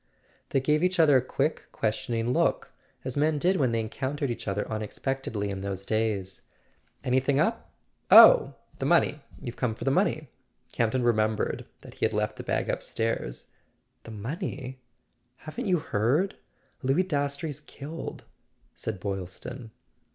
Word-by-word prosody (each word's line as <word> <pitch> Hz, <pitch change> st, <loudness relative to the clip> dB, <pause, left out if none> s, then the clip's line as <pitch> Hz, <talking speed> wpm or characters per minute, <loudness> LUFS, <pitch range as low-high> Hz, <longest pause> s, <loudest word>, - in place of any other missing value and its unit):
They 135 Hz, -, +2 dB
gave 150 Hz, +4 st, +2 dB
each 180 Hz, 0 st, +1 dB
other 150 Hz, -4 st, +7 dB
a -, -, +3 dB
quick 140 Hz, +4 st, -1 dB
questioning 115 Hz, +2 st, -1 dB
look, -, -, +1 dB, 0.3 s
as 130 Hz, -, -3 dB
men 150 Hz, +1 st, +2 dB
did 180 Hz, +6 st, +2 dB
when 130 Hz, -5 st, +2 dB
they 115 Hz, -1 st, +1 dB
encountered 130 Hz, +5 st, -3 dB
each 115 Hz, -, -6 dB
other 100 Hz, +1 st, -1 dB
unexpectedly 110 Hz, 0 st, -3 dB
in 95 Hz, -1 st, -4 dB
those 95 Hz, -1 st, -4 dB
days. 105 Hz, -4 st, -1 dB, 0.6 s
"Anything 130 Hz, +2 st, +2 dB
up? -, -, 0 dB, 0.4 s
Oh, -, -, +9 dB, 0.2 s
the -, -, -1 dB
money—you've 120 Hz, -, 0 dB
come 120 Hz, -4 st, 0 dB
for -, -, -7 dB
the 135 Hz, -, +2 dB
money?" 155 Hz, -5 st, +1 dB, 0.4 s
Campton 120 Hz, +2 st, +1 dB
remembered 110 Hz, -2 st, +1 dB
that -, -, -12 dB
he -, -, -1 dB
had 110 Hz, -, 0 dB
left 105 Hz, 0 st, -1 dB
the -, -, -6 dB
bag -, -, -1 dB
upstairs. 110 Hz, -, -2 dB, 0.6 s
"The -, -, -12 dB
money? 130 Hz, -, -5 dB, 0.7 s
Haven't 210 Hz, +10 st, -4 dB
you 180 Hz, -2 st, +3 dB
heard? 150 Hz, -, +1 dB, 0.5 s
Louis 135 Hz, +6 st, +2 dB
Dastrey's 145 Hz, -3 st, -2 dB
killed," 155 Hz, +4 st, -8 dB, 0.5 s
said 110 Hz, -4 st, -4 dB
Boylston. 100 Hz, +6 st, -5 dB
125 Hz, 145 wpm, -27 LUFS, 110-145 Hz, 0.7 s, Oh